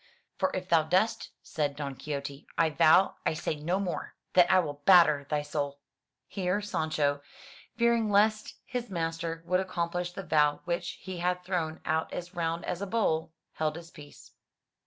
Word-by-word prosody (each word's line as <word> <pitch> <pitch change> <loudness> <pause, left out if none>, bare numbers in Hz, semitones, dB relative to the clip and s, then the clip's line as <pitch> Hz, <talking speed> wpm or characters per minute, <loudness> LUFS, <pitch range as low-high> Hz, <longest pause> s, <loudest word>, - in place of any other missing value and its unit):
For 190 - +1
if 185 0 -4
thou 165 -3 +5
dost," 185 +8 +1
said 145 -2 -2
Don 140 -1 -4
Quixote, 140 +1 -6
"I 165 -1 +3
vow, 160 +6 +5
I - - 0
say 155 - -2
no 160 +5 -1
more, 185 -3 -4 0.2
that 180 -1 +6
I 185 - +6
will 145 -5 -1
batter 155 -7 +6
thy 150 -1 0
soul." 145 -1 -3 0.5
Here 185 +1 -1
Sancho, 155 -7 -1 0.6
fearing 235 -2 +3
lest 215 +1 +2
his 245 -2 -4
master 165 -2 -3
would 180 +1 +2
accomplish 175 -1 -2
the 195 - -6
vow 150 -3 +2
which 175 +1 -2
he 185 -2 -8
had 180 +1 -1
thrown 170 -4 -2
out 160 +1 0
as 175 +1 -6
round 165 -1 -2
as 180 - -3
a 200 - -3
bowl, 160 -7 0 0.2
held 155 -1 -1
his 170 0 -10
peace. 145 -2 -14
170 Hz, 170 wpm, -29 LUFS, 155-185 Hz, 0.6 s, that